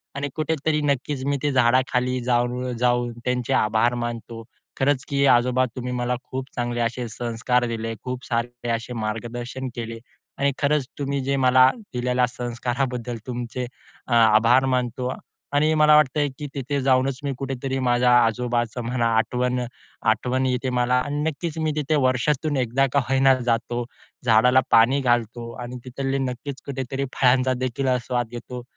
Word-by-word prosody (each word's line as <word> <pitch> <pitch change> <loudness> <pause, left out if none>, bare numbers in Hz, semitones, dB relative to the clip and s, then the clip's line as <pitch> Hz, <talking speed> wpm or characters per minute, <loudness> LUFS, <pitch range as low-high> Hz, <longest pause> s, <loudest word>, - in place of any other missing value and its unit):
आणि 140 0 -2
कुठेतरी 155 -1 0
नक्कीच 140 -1 -1
मी 140 0 +1
ते 145 - +2
झाडाखाली 125 0 +2
जाऊन 125 +1 0
जाऊन 120 0 +1
त्यांचे 125 -1 0
आभार 110 +3 +2
मानतो. 115 -1 -6 0.4
खरंच 135 0 +1
की 140 -1 +2
आजोबा, 125 +1 +4
"तुम्ही 125 -1 -4
मला 125 0 -1
खूप 130 0 -6
चांगले 120 0 -2
असे 120 +1 -2
संस्कार 120 +2 -1
दिले. 115 -1 -3
खूप 125 0 -5
सारे 120 0 -3
असे 115 +1 -3
मार्गदर्शन 120 +4 -4
केले 115 -1 -5 0.4
आणि 140 0 +2
खरंच 145 -2 +1
तुम्ही 140 0 -1
जे 140 +1 0
मला 130 +1 +7 0.2
दिलेल्या 125 0 +1
संस्काराबद्दल 120 0 -3
तुमचे 125 0 -4 0.4
अ, 120 - -1
आभार 115 +3 +5
मानतो." 125 +1 -2 0.4
आणि 155 +2 +3
मला 150 0 +7
वाटतं 150 0 +3
की 150 - -4
तिथे 140 +1 -2
जाऊनच 130 0 +2
मी 140 - -1
कुठेतरी 135 0 -3
माझ्या 125 -1 +3
आजोबाचं 120 +1 -1
म्हणा 120 0 0
आठवण 125 +2 0 0.5
आठवण 125 +4 0
येते 130 0 0
मला 125 0 +1
आणि 145 +1 -2
नक्कीच 160 +1 -5
मी 155 -1 0
तिथे 150 0 0
वर्षातून 140 +3 0
1 130 +2 +2
का 140 - +4
होईना 135 0 +5
जातो, 120 0 -1 0.4
झाडाला 125 +3 +5
पाणी 120 +5 +5
घालतो 120 -1 0
आणि 120 +1 -7
तिथले 135 +1 -2
नक्कीच 130 +2 -7
कुठेतरी 135 0 -3
फळांचा 130 0 +3
देखील 130 +2 -1 0.2
स्वाद 120 -2 -1
घेतो. 120 +1 -7
125 Hz, 150 wpm, -23 LUFS, 120-135 Hz, 0.5 s, मला